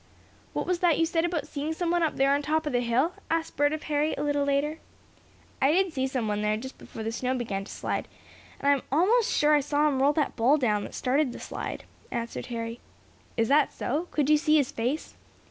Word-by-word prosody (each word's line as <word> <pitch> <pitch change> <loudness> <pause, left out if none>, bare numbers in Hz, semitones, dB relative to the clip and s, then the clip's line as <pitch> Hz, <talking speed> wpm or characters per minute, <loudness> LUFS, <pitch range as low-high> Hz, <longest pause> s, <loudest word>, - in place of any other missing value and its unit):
"What - - -2
was 360 -1 0
that 345 -4 +3
you 330 - +3
said 330 0 +1
about 345 -3 -2
seeing 295 +2 -3
someone 345 +1 0
up 320 -2 +1
there 275 +1 +3
on 285 - +1
top 315 +2 0
of 295 - -2
the 245 - +3
hill?" 245 +8 +1 0.2
asked 330 0 -1
Bert 290 +1 +3
of 310 0 -4
Harry, 300 +1 0
a - - -3
little 290 -1 +1
later. 285 +3 0 0.8
"I 270 - +5
did 375 -1 +2
see 265 -3 0
someone 220 -6 -1
there 210 0 +1
just 260 +4 -8
before 220 - -8
the 225 - -2
snow 255 +2 -1
began 210 -6 -3
to - - -10
slide, - - -3 0.5
and 280 - -2
I'm 280 -2 +2
almost 410 - +3
sure 300 +1 +3
I 300 - +6
saw 290 +1 +1
him 270 -3 +1
roll 280 +2 +5
that 300 -2 0
ball 250 +6 +4
down 210 -7 +1
that - - -9
started 265 +1 +1
the - - -8
slide," - - -5 0.3
answered 235 0 -4
Harry. 230 -1 -4 0.6
"Is 225 -1 +2
that 290 +2 +4
so? 310 +7 -2
Could 295 -3 0
you 305 0 +6
see 305 0 +3
his 285 -1 +1
face?" 260 +4 -2
290 Hz, 230 wpm, -27 LUFS, 250-310 Hz, 0.8 s, I